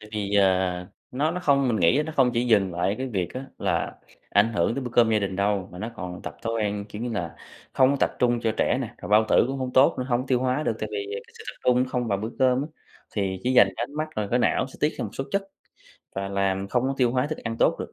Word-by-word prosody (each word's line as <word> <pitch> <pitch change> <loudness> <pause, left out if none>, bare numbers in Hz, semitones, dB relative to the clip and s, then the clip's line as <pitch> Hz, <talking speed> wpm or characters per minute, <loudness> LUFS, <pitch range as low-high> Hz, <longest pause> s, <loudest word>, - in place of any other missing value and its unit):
Tại 105 - -13
vì, 105 -1 -2
ờ, 95 -2 +3 0.4
nó 145 +5 0
nó 180 +2 -3
không 140 -5 +3
mình 115 - +1
nghĩ 105 - +3
nó 160 - -5
không 130 -2 +4
chỉ 120 +1 +1
dừng 100 -6 +3
lại 90 +2 0
ở 100 - 0
cái 130 - -2
việc 95 -7 -2
á 130 +1 -5
là - - -1 0.4
ảnh 115 - +3
hưởng 95 +2 +1
tới 140 - -3
bữa 125 - -5
cơm 120 -2 +4
gia 110 - +3
đình 100 -2 -3
đâu, 100 -1 0
mà 90 - -9
nó 110 +4 -4
còn 90 -3 -6
tập - - -7
thói 115 - -2
quen, 105 -2 -1
kiểu, 105 +2 -7
như 120 - -2
là 85 -6 -4 0.4
không 130 0 +4
có 140 - +1
tập - - +3
trung 120 -1 +2
cho 115 -1 0
trẻ 125 - +2
nè, 120 -4 -5
rồi - - -8
bao 105 +1 +5
tử - - +5
cũng 135 +1 -3
hông 130 -1 -3
tốt 130 +2 +5
nữa, 130 - -1
hông 125 +1 0
tiêu 125 -2 +2
hóa 130 +4 0
được 115 - -1
tại 110 - -2
vì 100 -1 -3 0.2
cái - - -21
sự - - -10
tập - - -7
trung 125 0 +4
không 125 -2 -2
vào 100 -2 0
bữa 110 +3 -4
cơm 130 +1 +3
á. - - -4 0.5
Thì 95 -3 -1
chỉ 125 - +1
dành 125 - +7
cái - - -1
ánh 140 - -14
mắt 155 +1 -2
rồi 105 -2 -1
cái 125 - +3
não 125 - +2
sẽ 130 - -15
tiết 150 - +1
ra - - -2
một - - -5
số 135 - -4
chất 200 0 +1 0.7
và 95 0 -3
làm 100 0 -1
không 125 +3 +1
có 135 +1 0
tiêu 125 -3 +3
hóa 125 +2 +1
thức 155 +1 -4
ăn 115 -1 -4
tốt - - +3
được, - - -6
115 Hz, 300 wpm, -25 LUFS, 100-130 Hz, 0.7 s, dành